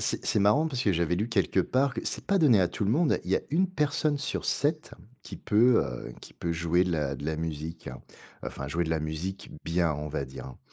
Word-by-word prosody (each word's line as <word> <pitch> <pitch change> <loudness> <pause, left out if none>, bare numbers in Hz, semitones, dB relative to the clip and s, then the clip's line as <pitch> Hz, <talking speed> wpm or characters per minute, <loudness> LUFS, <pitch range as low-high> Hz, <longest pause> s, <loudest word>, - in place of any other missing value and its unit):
c'est - - 0
c'est - - +2
marrant 105 +11 +4
parce 130 -5 -2
que 100 - +2
j'avais 85 0 +1
lu 105 +6 -1
quelque 100 -3 +2
part 130 +7 +1
que - - -3
c'est - - -3
pas 200 - +2
donné 130 - +5
à 90 - +4
tout 100 - -3
le 100 - +1
monde. 155 +4 +2
Il - - -5
y - - +4
a - - -1
1 180 +5 +2
personne 150 -2 0
sur 140 - -3
7 155 +2 0 0.3
qui - - -9
peut, 115 +3 +4
heu, - - -6
qui - - -13
peut 85 - -4
jouer 85 +2 +2
de 90 - -2
la 75 -4 -1
de 70 - -7
la 80 0 -1
musique, 80 +1 -5 0.6
enfin, 70 - -5
jouer 85 +5 -1
de 80 - -3
la 80 - +1
musique 80 +5 -5
bien, 85 -1 +1
on 75 +1 -5
va 70 -2 -3
dire, 65 0 -9
hein. 65 - -11
90 Hz, 250 wpm, -28 LUFS, 80-130 Hz, 0.6 s, donné